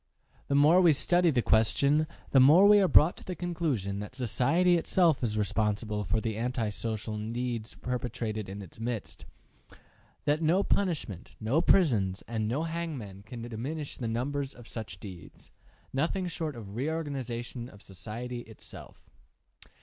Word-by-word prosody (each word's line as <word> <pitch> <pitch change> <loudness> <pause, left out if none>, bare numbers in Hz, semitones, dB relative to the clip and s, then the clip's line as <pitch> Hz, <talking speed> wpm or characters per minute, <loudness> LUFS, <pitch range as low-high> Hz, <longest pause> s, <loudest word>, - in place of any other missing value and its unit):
The 140 - 0
more 155 +6 +6
we 170 -3 +6
study 175 +4 +2
the 125 -6 +1
question, 140 +8 +3 0.2
the 135 - +6
more 155 +9 +7
we 205 0 +7
are 190 - +4
brought 165 0 +5
to - - -11
the 180 - -5
conclusion 155 - -2
that 105 +5 -7
society 150 - +2
itself 170 -2 +2
is 110 -2 -1
responsible 105 0 -1
for 95 +5 +1
the 110 -1 -3
anti 120 -1 -1
social 110 +1 -4 0.2
deeds 120 -2 -3
perpetrated 115 -4 -4
in 100 +1 -7
its 95 - -14
midst, 115 -2 -5 0.4
and - - -18 0.5
that 150 +2 +2
no 170 +5 +3
punishment, 155 - -2
no 120 +9 +1
prisons, 105 - +3
and 110 -2 -2
no 135 +8 -1
hangmen 155 - -5
can 115 0 -7
diminish 135 +6 -5
the 120 - -3
numbers 135 +4 -2
of 120 -2 -13
such 110 -5 -7
deeds; 90 -4 -11 0.4
nothing 165 +7 0
short 160 -4 -4
of 110 -4 -9
a - - -10
reorganization 125 -3 -4
of 100 -3 -15
society 115 +6 -6
itself. 110 -2 -13
125 Hz, 155 wpm, -29 LUFS, 110-155 Hz, 0.5 s, more